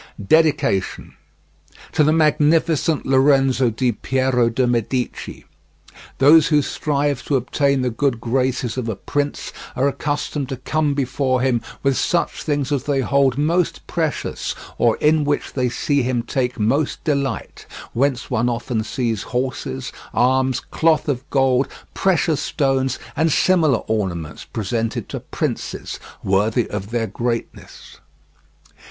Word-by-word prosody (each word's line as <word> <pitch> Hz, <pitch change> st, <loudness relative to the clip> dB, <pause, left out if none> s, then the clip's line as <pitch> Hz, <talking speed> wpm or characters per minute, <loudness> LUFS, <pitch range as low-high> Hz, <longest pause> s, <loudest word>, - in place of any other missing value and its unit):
DEDICATION 150 Hz, -, +2 dB, 0.8 s
To 155 Hz, -, +3 dB
the 150 Hz, -, +4 dB
Magnificent 155 Hz, 0 st, +2 dB
Lorenzo 135 Hz, -1 st, +3 dB
Di 120 Hz, +3 st, 0 dB
Piero 130 Hz, 0 st, +1 dB
De' 125 Hz, +2 st, +1 dB
Medici 120 Hz, +1 st, -2 dB, 0.7 s
Those 150 Hz, +3 st, +6 dB
who 150 Hz, -2 st, +3 dB
strive 145 Hz, -2 st, -1 dB
to 145 Hz, -, 0 dB
obtain 135 Hz, +1 st, +1 dB
the 125 Hz, -, 0 dB
good 120 Hz, 0 st, 0 dB
graces 125 Hz, 0 st, -1 dB
of 120 Hz, -3 st, -2 dB
a 110 Hz, -, -2 dB
prince 145 Hz, +8 st, -3 dB, 0.2 s
are 135 Hz, +2 st, +2 dB
accustomed 145 Hz, -1 st, -2 dB
to 135 Hz, -, -4 dB
come 145 Hz, +2 st, 0 dB
before 130 Hz, -1 st, 0 dB
him 125 Hz, -3 st, +1 dB, 0.2 s
with 135 Hz, -1 st, +2 dB
such 170 Hz, -1 st, 0 dB
things 145 Hz, -2 st, -1 dB
as 140 Hz, -2 st, 0 dB
they 140 Hz, -2 st, +1 dB
hold 135 Hz, 0 st, +2 dB
most 165 Hz, +4 st, 0 dB
precious, -, -, -2 dB, 0.2 s
or 115 Hz, -2 st, +3 dB
in 155 Hz, 0 st, +3 dB
which 145 Hz, 0 st, -1 dB
they 125 Hz, -2 st, 0 dB
see 140 Hz, +3 st, 0 dB
him 125 Hz, -1 st, -1 dB
take 125 Hz, -2 st, -2 dB
most 135 Hz, +8 st, 0 dB
delight; 140 Hz, -7 st, -2 dB, 0.3 s
whence 130 Hz, 0 st, 0 dB
one 120 Hz, 0 st, +1 dB
often 115 Hz, -1 st, -2 dB
sees 115 Hz, -3 st, -2 dB
horses, 130 Hz, +1 st, -3 dB, 0.2 s
arms, 130 Hz, +1 st, +2 dB
cloth 160 Hz, -1 st, +2 dB
of 135 Hz, -1 st, -3 dB
gold, 135 Hz, -1 st, +2 dB, 0.3 s
precious 170 Hz, -5 st, +1 dB
stones, 135 Hz, -3 st, 0 dB, 0.2 s
and 160 Hz, +2 st, +2 dB
similar 160 Hz, -5 st, +3 dB
ornaments 85 Hz, -8 st, -3 dB
presented 115 Hz, +1 st, -3 dB
to -, -, -4 dB
princes, -, -, -4 dB, 0.2 s
worthy 105 Hz, +5 st, +1 dB
of 100 Hz, -1 st, -4 dB
their 115 Hz, -1 st, -1 dB
greatness. 115 Hz, +3 st, -5 dB
130 Hz, 135 wpm, -21 LUFS, 120-145 Hz, 0.8 s, Those